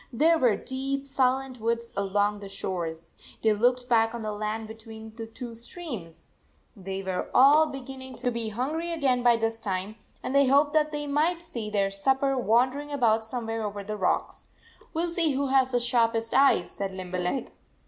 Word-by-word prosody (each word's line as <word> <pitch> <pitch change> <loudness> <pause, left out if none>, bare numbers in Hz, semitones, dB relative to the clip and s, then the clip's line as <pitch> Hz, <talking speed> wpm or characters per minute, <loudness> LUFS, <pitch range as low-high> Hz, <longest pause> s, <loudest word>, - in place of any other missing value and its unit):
There 320 +7 +3
were 240 -7 +4
deep, 270 +1 -3
silent 265 -1 0
woods 230 +1 -2
along 205 +1 0
the 200 -1 -8
shores. 170 -4 -4 0.3
They 220 -1 +4
looked 245 +3 +1
back 225 -1 +3
on 235 - -5
the 215 - -2
land 215 +1 -3
be 220 - -7
tween 220 0 -11
the 225 -1 -6
two 235 +1 -8
streams. 230 - -8 0.5
They 195 -1 -5
were 185 -1 -3
all 295 +4 +7
be 270 -2 -6
ginning 260 0 -9
to 245 +1 -1
be 230 -2 -2
hungry 300 +10 -2
again 270 -7 +1
by 240 -1 +5
this 225 0 -1
time, 195 +1 -3 0.3
and - - -3
they 280 -1 +5
hoped 285 +2 +4
that 305 -1 +3
they 295 -1 -3
might 315 +4 +1
see 225 -9 -5
their 200 -2 +1
supper 265 +7 +1
wandering 255 +5 +1
about 230 -6 +2
somewhere 225 -1 -4
over 205 -1 -4
the 210 +1 -4
rocks. 190 -3 -1 0.2
" - - -26
We 330 - +1
ll 345 - -4
see 330 -4 +1
who 275 0 -1
has 260 -1 +3
the 245 - +2
sharpest 230 -2 +1
eyes," 270 -10 +4
said 195 -1 -4
Limberleg. 185 +4 -3
235 Hz, 190 wpm, -27 LUFS, 210-270 Hz, 0.5 s, all